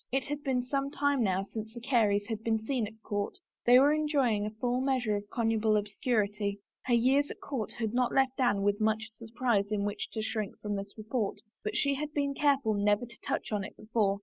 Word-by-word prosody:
It 270 +1 +1
had 290 +2 -4
been 260 -3 0
some 275 +2 -1
time 285 -2 +1
now 190 -3 +1
since 220 +3 -7
the - - -5
Careys 220 -5 +2
had 220 0 -4
been 225 -1 +2
seen 245 -4 0
at 220 +1 -13
court; 205 - -2 0.3
they 245 +1 +9
were 285 +3 +6
enjoying 275 -9 +1
a 215 0 -8
full 245 +1 +1
measure 255 -5 +1
of 205 0 -5
connubial 225 -2 +1
obscur 210 +2 +1
ity. 205 -1 -3 0.3
Her 245 - +3
years 270 +5 +3
at - - -7
court 250 -7 -4
had 225 -2 -3
not 250 0 +2
left 265 0 +2
Anne 205 -6 +2
much 220 0 +1
surprise 225 -3 0
in 205 -1 0
which 205 - -3
to 220 - -2
shrink 215 -2 -3
from 210 -1 -3
this 200 0 -6
report, 220 -1 -2 0.3
but 210 - -3
she 280 - +2
had 295 +2 -3
been 280 -1 +1
careful 275 -6 +2
never 205 +2 +2
to 235 0 -15
touch - - -3
on 205 -2 0
it 210 - -9
before. 210 -3 0
225 Hz, 220 wpm, -30 LUFS, 210-260 Hz, 0.3 s, they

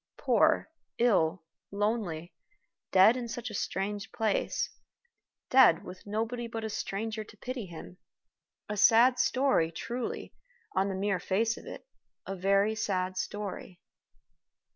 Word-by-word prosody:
Poor, - - +2 0.3
ill, 185 -7 +2 0.3
lonely 200 -5 -2 0.6
dead 195 +5 +7
in 250 -1 -3
a 240 +1 -6
strange 200 +1 -3
place 220 -3 -1 0.8
dead, 255 -11 +6
with 185 +2 -11
nobody 230 +3 -2
but 225 -1 -5
a 220 - -3
stranger 215 +2 -3
to 210 - -16
pity 245 -2 -5
him. 175 +1 -10 0.7
A 210 - -4
sad 240 +5 +6
story; 255 -14 +2
truly, 235 +9 -5 0.4
on 190 +1 +2
the 190 - -3
mere 195 -1 0
face 220 +6 0
of - - -12
it, - - -9 0.4
a 195 - -4
very 195 +3 +2
sad 185 -3 -1
story. 190 -2 -5
205 Hz, 125 wpm, -30 LUFS, 190-230 Hz, 0.8 s, dead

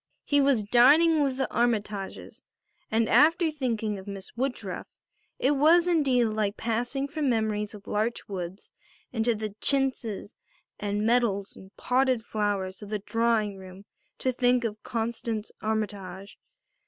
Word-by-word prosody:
He 285 -1 +3
was 275 -6 +3
dining 295 +9 +5
with 270 -2 0
the 265 - 0
Armytages 210 -4 -2 0.5
and 225 0 +2
after 325 - +4
thinking 225 -8 -2
of 190 - -12
Miss 195 -1 -8
Woodruff 260 +2 -3 0.5
it 270 - +2
was 320 +5 +5
indeed 275 -8 +3
like 215 -2 -1
passing 245 +5 -1
from 295 -1 -1
memories 215 -2 -1
of 205 - -13
larch 220 +3 -2
woods 185 0 -6 0.4
into 230 0 +1
the 215 -1 -5
chintzes 260 -7 -1 0.4
and 205 +1 -1
metals 225 -4 +1
and 190 - -13
potted 255 -2 +1
flowers 200 -4 -2
of 205 - -9
the 210 - -1
drawing 220 -1 0
room 190 +1 -12 0.3
to 260 - 0
think 245 0 +2
of 215 -2 -4
Constance 225 -1 -3
Armytage. 200 -3 -4
225 Hz, 140 wpm, -27 LUFS, 205-260 Hz, 0.5 s, dining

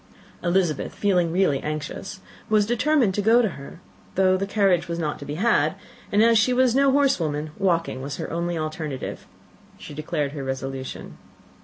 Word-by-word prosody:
Elizabeth, 175 -4 0
feeling 180 -5 +1
really 175 -6 +2
anxious, 155 +6 -5 0.3
determined 230 +3 +2
to 205 - 0
go 225 +4 +5
to 220 - +1
her, 140 0 -10 0.4
though 185 0 +4
the 195 +1 -2
carriage 195 -4 +2
was 170 0 -3
not 155 -3 -2
to 145 - -8
be 145 - -5
had: 225 +8 +2 0.4
and 205 +2 +4
as 230 -1 +5
she 250 +3 +3
was 255 -1 +3
no 275 +1 +4
horsewoman, 160 - +1
walking 170 -8 0
was 140 +1 -5
her - - -5
only 170 +1 -2
alternative. 155 -3 -5 0.5
She - - -10
declared 150 -1 -2
her 145 -2 -6
resolution. 135 0 -5
175 Hz, 165 wpm, -24 LUFS, 150-210 Hz, 0.5 s, go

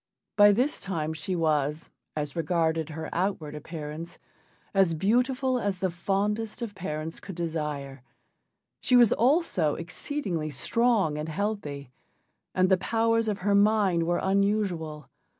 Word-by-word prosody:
By 205 0 +8
this 250 +8 +1
time 160 -5 -3
she 160 +4 -3
was, 155 -2 0 0.2
as 150 -2 -3
regarded 165 -1 0
her 160 0 -5
outward 170 -5 -1
appearance, 155 +1 -7 0.6
as 190 -4 +3
beautiful 250 - +1
as 200 -4 -1
the 185 -1 -1
fondest 210 +6 -1
of 220 -3 -5
parents 160 -4 -5
could 190 - -9
desire; 150 -5 -4 0.8
she 250 - +2
was 240 -3 +7
also 240 - +2
exceedingly 175 - -3
strong 195 - +1
and 155 +1 -4
healthy, 155 - -3 0.6
and 185 0 +4
the 190 0 +4
powers 230 +3 +1
of 205 -3 -2
her 205 - +3
mind 200 -5 +3
were 175 0 +1
unusual. 190 - 0
180 Hz, 135 wpm, -27 LUFS, 155-210 Hz, 0.8 s, By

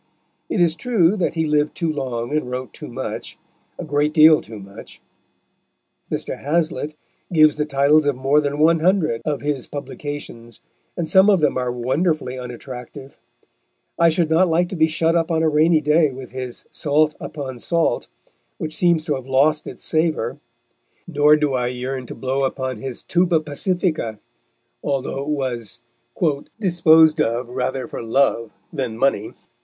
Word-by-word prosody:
It - - -1
is 170 -2 +4
true 210 -5 +2
that 180 - -1
he 160 -1 0
lived 150 -1 +1
too 165 -2 -1
long 130 -2 -3
and 155 -5 -1
wrote 125 -2 -5
too - - -9
much - - -6 0.4
a - - -6
great 145 +2 0
deal 155 -1 +7
too 110 -1 -10
much. 100 0 -12 1.1
Mr. - - -4
Hazlitt 155 -1 -1 0.4
gives 155 -3 +5
the 150 0 -2
titles 145 +2 +3
of 145 - +2
more 135 +4 +2
than 145 0 -2
one 165 +2 +4
hundred 165 -8 +1
of 150 -2 -2
his 145 -3 -2
publications, 145 -5 -7 0.4
and 170 -2 -2
some 190 +4 +5
of 195 -3 +4
them 150 -2 +2
are 125 -1 -1
wonderfully 130 +3 -1
unattractive. 125 +2 -9 0.8
I 170 0 +6
should 165 0 +1
not 175 +3 +4
like 175 +2 +1
to 190 - -5
be 160 -2 +3
shut 160 +1 +1
up 165 -1 +1
on 160 -1 +1
a 160 - +3
rainy 155 +1 +3
day 150 +1 +3
with 130 -1 -9
his 130 -1 -6
Salt 150 +1 +1
upon 135 -5 -6
Salt, 170 +5 0 0.5
which 155 - -5
seems 170 -3 +2
to 155 - 0
have 130 -2 -6
lost 150 +3 +2
its - - -8
savour, 155 -6 0 0.7
nor 150 -2 +4
do 150 -2 0
I 125 -1 0
yearn 125 +1 -4
to - - -8
blow 130 +3 -2
upon 130 -2 -2
his 125 +2 -7
Tuba 175 -2 +2
Pacifica, 155 - -2 0.6
although 135 -1 -2
it 140 - -6
was 120 -6 -3 0.8
"disposed 160 -5 +5
of 120 0 -1
rather 130 +1 -2
for - - -7
love 115 -1 +1 0.2
than 125 -7 -3
money." 120 -4 0
150 Hz, 165 wpm, -21 LUFS, 130-160 Hz, 1.1 s, deal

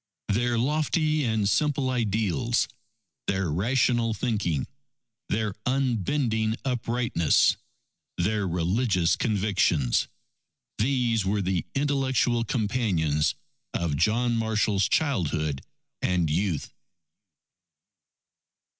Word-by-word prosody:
Their 120 +3 +1
lofty 155 +3 +1
and 110 -3 +1
simple 140 +3 +1
ideals, 115 0 0 0.6
their 95 -4 0
rational 115 - +1
thinking, 100 - -1 0.6
their 105 -1 -1
unbending 120 -3 0
uprightness, 120 - +2 0.6
their 105 +3 0
religious 90 +1 +1
convictions 100 - +1 0.7
these 120 -2 +1
were 100 +1 0
the 90 -3 -1
intellectual 135 -4 +1
companions 90 - 0 0.4
of 85 -4 -1
John 115 +9 +2
Marshall's 110 -3 +1
childhood 80 - 0 0.4
and 90 -4 +1
youth. 85 -1 -1
110 Hz, 80 wpm, -26 LUFS, 90-125 Hz, 0.7 s, uprightness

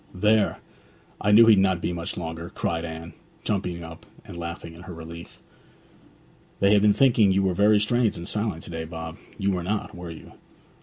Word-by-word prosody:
'There; 105 +2 +2 0.6
I 105 - +2
knew 115 +3 +8
he'd 110 -3 +7
not 95 -2 +2
be 90 - -2
much 85 -1 -4
longer!' 85 0 -5
cried 85 0 -2
Anne, 80 +1 -7 0.3
jumping 90 -4 -2
up 80 0 -11 0.2
and - - -10
laughing, 85 -1 -6
in 85 - -13
her 90 -1 -9
relief. 85 +1 -10 1.2
'They 100 +1 +4
have 105 - +5
been 105 0 +5
thinking 115 -4 +4
you 95 +1 +2
were 95 -1 +1
very 105 +3 +4
strange 115 +1 +1
and 85 +1 -7
silent 105 -6 -2
to - - -9
day, 80 -1 -4
Bob; 80 0 -7 0.2
you 100 0 0
were 90 -2 -1
not, 105 +4 -3
were 90 -1 -8
you?' 80 - -11
90 Hz, 195 wpm, -25 LUFS, 85-105 Hz, 1.2 s, knew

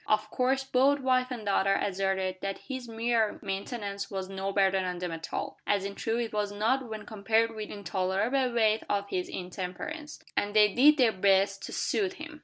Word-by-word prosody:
Of 215 0 +1
course 265 +1 +1
both 270 +2 +3
wife 255 -1 +2
and 240 -4 -6
daughter 195 0 +3
asserted 190 -1 -1
that 195 0 -3
his 260 -3 -7
mere 225 -1 +1
maintenance 200 0 -4
was 190 -1 -4
no 195 0 -3
burden 195 -1 +2
on 180 -1 -3
them 175 -1 -3
at 165 0 -6
all - - -4
as 200 -1 +1
in 200 - -4
truth 225 +3 -1
it 225 - -9
was 210 -1 -1
not 230 +5 0
when 215 -1 -6
compared 225 +1 +1
with 215 -1 -5
the - - -6
intolerable 200 +7 0
weight 220 -2 +3
of 200 0 -1
his 180 -2 -2
intemperance 185 - -6 0.2
and 205 +1 -1
they 210 -2 +6
did 295 +4 +6
their 245 -5 +5
best 195 0 +2
to - - -8
soothe 390 -3 0
him. 315 -3 -9
210 Hz, 200 wpm, -29 LUFS, 195-245 Hz, 0.2 s, they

